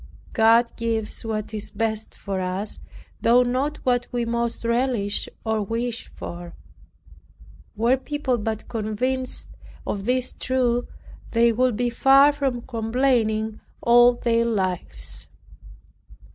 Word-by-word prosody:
God 230 +1 +4
gives 225 -2 -2
what 220 -1 -4
is 210 -1 -2
best 220 0 -3
for 195 -2 -4
us, 185 +3 -3 0.4
though 245 +2 +5
not 265 +5 -1
what 245 -1 +2
we 240 -1 -1
most 235 0 -2
relish 235 -4 0 0.2
or 220 -1 0
wish 230 +3 -3
for. 175 0 -8 1.2
Were 235 +5 +3
people 265 -2 -2
but 220 0 -3
convinced 250 +4 -2 0.4
of 200 -1 -3
this 255 +1 0
truth, 245 -2 0 0.5
they 230 0 +4
would 250 0 +2
be 240 0 0
far 275 +4 +6
from 270 -4 -2
complaining 225 -2 0 0.2
all 240 +1 +7
their 230 -1 +1
lives. 185 - -2
235 Hz, 115 wpm, -24 LUFS, 220-250 Hz, 1.2 s, all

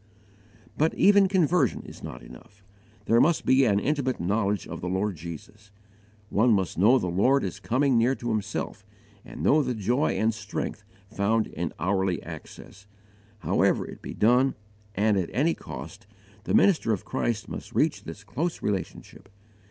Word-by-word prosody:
But 160 +2 +2
even 200 -1 +5
conversion 180 - +1
is - - -12
not - - -8
enough: 100 +11 -15 0.4
there 115 +1 +4
must 165 +1 +2
be 130 +1 +4
an 100 -4 +3
intimate 135 +1 -1
knowledge 100 +1 -1
of - - -7
the 90 - -3
Lord 95 +2 -1
Jesus. 85 +6 -10 0.6
One 115 +3 +4
must 95 -4 0
know 110 +9 +5
the 125 - -2
Lord 115 +11 +2
as - - -4
coming 130 0 +2
near 125 +4 +2
to 120 - -5
himself, 105 -2 -3 0.4
and - - -9
know 155 +2 +4
the 125 -3 -2
joy 120 +8 0
and 110 +1 +1
strength 110 - -5 0.3
found 110 +2 +1
in 85 0 -4
hourly 95 +2 0
access. 100 +1 -11 0.5
However - - +1
it - - -11
be - - -7
done, 125 +5 +3 0.4
and 105 +1 +2
at 90 -3 -1
any 155 +6 +2
cost, 105 +1 -9 0.4
the - - +1
minister 165 - +4
of 105 - -2
Christ 115 -2 -2
must - - -8
reach - - +1
this 95 +5 -9
close 165 +10 -3
relationship. 100 0 -5
110 Hz, 160 wpm, -26 LUFS, 100-135 Hz, 0.6 s, even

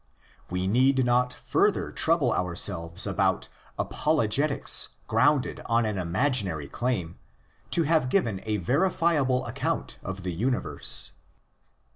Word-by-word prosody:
We 90 +1 -2
need 130 +5 +3
not 125 +1 +2
further - - 0
trouble - - +2
ourselves 85 -1 -1
about - - 0 0.3
apologetics 145 -1 +2 0.2
grounded 130 +5 +1
on 115 0 +2
an 105 -3 -2
imaginary 95 - 0
claim 95 - -3 0.5
to! 170 - +2
have 155 -4 +1
given 115 - 0
a 105 -1 0
verifiable 140 - +1
account - - -3
of 95 -1 -6
the 90 -1 -3
universe. 125 +8 0
120 Hz, 110 wpm, -26 LUFS, 95-135 Hz, 0.5 s, need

